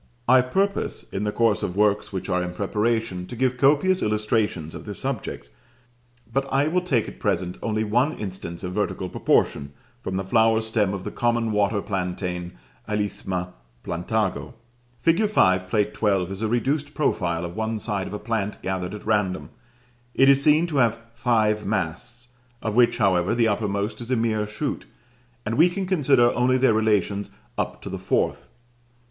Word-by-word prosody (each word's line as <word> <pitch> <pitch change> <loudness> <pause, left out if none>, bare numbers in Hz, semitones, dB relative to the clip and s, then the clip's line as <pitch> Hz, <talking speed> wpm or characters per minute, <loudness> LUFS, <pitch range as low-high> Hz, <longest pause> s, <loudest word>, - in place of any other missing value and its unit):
I 130 +1 +7
purpose, 195 +11 -1
in 95 +2 -2
the 105 - 0
course 115 -2 +2
of 90 - -3
works 105 0 +2
which 95 -2 -4
are 90 -2 +1
in 90 0 -4
preparation, 105 -1 -1
to 125 - -7
give 130 +1 +1
copious 145 +8 +3
illustrations 105 -6 0
of - - -9
this 105 -2 -5
subject, 130 - -4 0.8
but 135 0 -1
I 140 +2 +2
will 180 +3 +1
take 135 -11 0
at - - -10
present 90 +1 -1
only 110 -1 -1
one 125 +8 +1
instance 90 -4 -6
of 90 0 -4
vertical 100 -2 -2
proportion, 70 -4 +1 0.3
from 95 -3 -3
the 95 - -1
flower 110 +3 +3
stem 110 -3 0
of 95 - -6
the - - -5
common 120 -1 0
water 105 0 +1
plantain, 90 -2 -3 0.4
Alisma 95 -3 -2 0.3
Plantago. 100 +6 -2 0.5
Fig. 170 - +3
5, 95 - +3
Plate 105 +1 0
XII. 95 -4 +1
is 95 +1 -6
a 110 - +1
reduced 140 +6 -1
profile 85 - 0
of 85 +1 -7
one 110 0 -2
side 100 -2 -2
of - - -8
a - - -2
plant 105 -2 -3
gathered 95 +1 -3
at 105 - -10
random; 105 -4 0 0.6
it 135 +1 +6
is 140 0 +5
seen 155 +3 +4
to 160 -4 -3
have 115 -3 +3 0.2
five 110 -3 +1
masts, 115 +6 -3 0.3
of 110 -2 -2
which, 120 -1 +4
however, 90 +1 +2
the 115 -1 +3
uppermost 105 +1 -1
is 120 - -7
a 130 - +2
mere 110 -2 0
shoot, 135 +7 -4 0.6
and 115 +5 -1
we 170 +3 +7
can 190 +2 -3
consider 140 -9 +3
only 125 +1 +2
their 130 -3 +4
relations 105 -2 +1 0.3
up - - -3
to - - -6
the - - -4
fourth. - - 0
110 Hz, 175 wpm, -24 LUFS, 95-120 Hz, 0.8 s, I